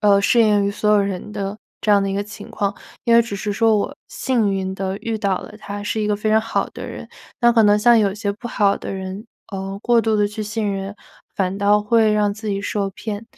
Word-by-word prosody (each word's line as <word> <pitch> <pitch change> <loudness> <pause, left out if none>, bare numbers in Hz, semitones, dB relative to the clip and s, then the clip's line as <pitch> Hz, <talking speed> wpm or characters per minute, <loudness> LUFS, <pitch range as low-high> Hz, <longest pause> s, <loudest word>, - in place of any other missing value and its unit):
呃， 200 -1 +5
适 235 +4 +3
应 205 -2 +3
于 - - 0
所 210 +1 0
有 210 -1 +5
人 195 0 -3
的 200 0 -4 0.2
这 210 - +2
样 200 -1 +5
的 195 - -1
一 - - -2
个 200 +1 -1
情 210 +1 -10
况， 200 0 -1 0.3
因 235 - +4
为 235 - +7
只 225 -3 -5
是 205 +1 -3
说 220 +1 +3
我 205 - -2
幸 230 -6 0
运 190 -1 -2
地 190 0 -3
遇 225 0 -3
到 195 -3 0
了 - - -10
他， 205 -1 -6
是 215 +1 -1
一 210 - 0
个 210 - +1
非 215 +1 -2
常 220 0 +5
好 225 +1 -1
的 - - -8
人。 - - -8 0.3
那 240 -1 +5
可 230 -1 +5
能 210 0 +5
像 240 +2 +5
有 200 -3 +2
些 205 -1 -2
不 240 +4 -8
好 205 -3 +2
的 - - -6
人， 190 +2 -6 0.3
呃， 195 0 -4
过 240 -1 +4
度 220 -1 +1
地 205 -1 +3
去 210 +1 -5
信 210 -1 -2
任， 195 +1 -5 0.4
反 190 0 0
倒 205 +1 +4
会 220 +1 +3
让 210 -1 +1
自 215 0 -6
己 200 -1 -1
受 200 -1 -2
骗。 210 +2 -6
205 Hz, 275 characters per minute, -21 LUFS, 200-220 Hz, 0.4 s, 为